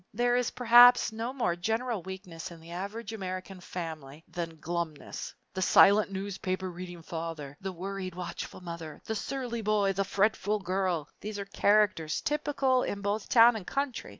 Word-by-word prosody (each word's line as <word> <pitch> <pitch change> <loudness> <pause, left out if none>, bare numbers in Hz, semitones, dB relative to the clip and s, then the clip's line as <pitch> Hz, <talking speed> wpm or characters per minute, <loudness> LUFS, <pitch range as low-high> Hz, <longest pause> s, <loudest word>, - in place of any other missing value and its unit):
There 245 +2 +2
is 245 -1 +1
perhaps 245 0 +7
no 225 +3 -3
more 245 -10 0
general 225 +4 -1
weakness 185 -3 -7
in 170 -1 -11
the 165 +1 -13
average 200 +5 -5
American 185 -2 -5
family 160 -5 -7
than 165 -2 -5
glumness! 170 -2 -4 0.2
The 185 - -3
silent 200 +2 +6
newspaper 190 -1 -3
reading 175 -1 -8
father, 160 -4 -5
the 190 0 -3
worried 185 0 -5
watchful 180 0 -6
mother, 170 -3 -8
the 220 - -2
surly 240 +1 -3
boy, 205 -2 +2
the 195 +1 0
fretful 205 +1 +1
girl, 185 -5 -1
these 210 0 -5
are 200 - -4
characters 205 -6 +2
typical 280 -3 +1
in 200 - -3
both 205 +1 -2
town 235 0 +7
and 205 -5 -6
country. 275 -3 -2
195 Hz, 160 wpm, -29 LUFS, 175-220 Hz, 0.2 s, perhaps